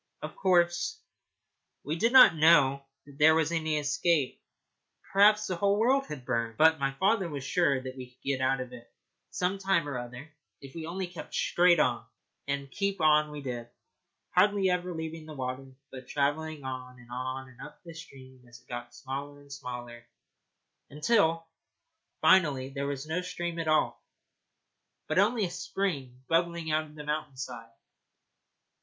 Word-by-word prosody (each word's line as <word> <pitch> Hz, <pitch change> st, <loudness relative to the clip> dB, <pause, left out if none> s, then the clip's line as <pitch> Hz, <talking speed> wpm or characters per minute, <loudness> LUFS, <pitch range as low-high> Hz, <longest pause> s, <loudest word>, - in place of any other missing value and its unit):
Of -, -, -6 dB
course, 180 Hz, -, +2 dB, 0.8 s
we 155 Hz, -, -2 dB
did 230 Hz, +8 st, +1 dB
not 255 Hz, -9 st, +9 dB
know 145 Hz, -4 st, +4 dB, 0.2 s
that 145 Hz, 0 st, -16 dB
there 160 Hz, +1 st, +7 dB
was 160 Hz, 0 st, +1 dB
any 160 Hz, -2 st, 0 dB
escape. 150 Hz, 0 st, 0 dB, 0.7 s
Perhaps 210 Hz, +2 st, +5 dB
the 185 Hz, -, -2 dB
whole 200 Hz, +3 st, +2 dB
world 265 Hz, +5 st, +2 dB
had 135 Hz, -4 st, -8 dB
burned. 115 Hz, -3 st, -2 dB
But 160 Hz, 0 st, +5 dB
my 135 Hz, 0 st, 0 dB
father 195 Hz, +2 st, +1 dB
was 140 Hz, -3 st, -5 dB
sure 140 Hz, -2 st, +2 dB
that 130 Hz, 0 st, -7 dB
we 130 Hz, -1 st, -9 dB
should 125 Hz, -, -31 dB
get 135 Hz, -1 st, -1 dB
out 130 Hz, 0 st, +1 dB
of 125 Hz, 0 st, -8 dB
it 120 Hz, -1 st, -13 dB, 0.4 s
some 185 Hz, +2 st, -1 dB
time 190 Hz, -6 st, +1 dB
or 140 Hz, -3 st, -3 dB
other 125 Hz, +5 st, -9 dB, 0.3 s
if 135 Hz, -1 st, -12 dB
we 160 Hz, -1 st, -6 dB
only 185 Hz, +3 st, -3 dB
kept 175 Hz, -2 st, -9 dB
straight 175 Hz, -1 st, +3 dB
on. 120 Hz, -5 st, +1 dB, 0.4 s
And 140 Hz, -1 st, -3 dB
keep 200 Hz, -1 st, -2 dB
on 150 Hz, -1 st, +4 dB
we 150 Hz, -1 st, -8 dB
did, 120 Hz, -3 st, -5 dB, 0.6 s
hardly 195 Hz, 0 st, +3 dB
ever 180 Hz, 0 st, -1 dB
leaving 160 Hz, -1 st, -6 dB
the 155 Hz, -, -9 dB
water, 130 Hz, 0 st, -4 dB, 0.2 s
but 130 Hz, -1 st, -10 dB
travelling 150 Hz, +1 st, -1 dB
on 130 Hz, -1 st, -6 dB
and 120 Hz, 0 st, -16 dB
on 130 Hz, +1 st, -5 dB
up -, -, -12 dB
the 170 Hz, -2 st, -10 dB
stream 130 Hz, -6 st, -13 dB
as 120 Hz, 0 st, -14 dB
it 125 Hz, -, -30 dB
got 120 Hz, 0 st, -7 dB
smaller 140 Hz, +2 st, -6 dB
and 140 Hz, -1 st, -12 dB
smaller, 120 Hz, -3 st, -8 dB, 0.9 s
until 165 Hz, +1 st, +2 dB, 0.8 s
finally 145 Hz, -8 st, +4 dB
there 140 Hz, 0 st, -4 dB
was 140 Hz, 0 st, -4 dB
no 160 Hz, +3 st, -2 dB
stream 175 Hz, -2 st, -4 dB
at 165 Hz, -, -3 dB
all, 155 Hz, 0 st, +1 dB, 1.0 s
but -, -, +1 dB
only 215 Hz, +1 st, +3 dB
a 175 Hz, -, -5 dB
spring 135 Hz, -13 st, -4 dB
bubbling 170 Hz, -1 st, 0 dB
out 155 Hz, 0 st, +1 dB
of 150 Hz, 0 st, -16 dB
the 150 Hz, -, -8 dB
mountain 150 Hz, -2 st, -4 dB
side. 120 Hz, -3 st, -7 dB
150 Hz, 170 wpm, -29 LUFS, 130-175 Hz, 1.0 s, not